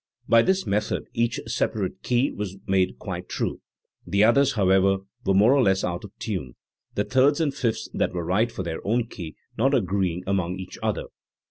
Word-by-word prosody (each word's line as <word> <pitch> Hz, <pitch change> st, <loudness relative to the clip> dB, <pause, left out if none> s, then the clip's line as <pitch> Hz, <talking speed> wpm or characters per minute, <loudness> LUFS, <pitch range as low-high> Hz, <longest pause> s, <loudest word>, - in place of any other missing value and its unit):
By 115 Hz, -, +6 dB
this 190 Hz, +8 st, +1 dB
method 105 Hz, +1 st, 0 dB
each 115 Hz, +1 st, 0 dB
separate 105 Hz, -4 st, -2 dB
key 125 Hz, +3 st, +1 dB
was 100 Hz, -2 st, -5 dB
made 95 Hz, -1 st, +1 dB
quite -, -, -6 dB
true; -, -, -2 dB, 0.4 s
the 100 Hz, +4 st, +2 dB
others, 140 Hz, +5 st, +4 dB
however, 95 Hz, -1 st, +3 dB, 0.3 s
were 95 Hz, -, +3 dB
more 105 Hz, +7 st, +6 dB
or 140 Hz, -, +4 dB
less 95 Hz, -4 st, +2 dB
out 85 Hz, 0 st, -2 dB
of 105 Hz, -, -9 dB
tune, 70 Hz, -, -4 dB, 0.4 s
the 105 Hz, -, +1 dB
thirds 135 Hz, +5 st, +3 dB
and 150 Hz, -4 st, +1 dB
fifths 120 Hz, -5 st, -1 dB
that -, -, 0 dB
were 85 Hz, -2 st, -3 dB
right 110 Hz, +7 st, +1 dB
for 95 Hz, -, -5 dB
their 80 Hz, -2 st, -4 dB
own 115 Hz, +3 st, +1 dB
key 85 Hz, -9 st, -8 dB, 0.2 s
not 135 Hz, +4 st, +3 dB
agree 95 Hz, -5 st, +1 dB
ing 90 Hz, +2 st, -6 dB
among 95 Hz, -2 st, 0 dB
each 95 Hz, -1 st, -8 dB
other. -, -, -1 dB
100 Hz, 195 wpm, -25 LUFS, 95-120 Hz, 0.4 s, By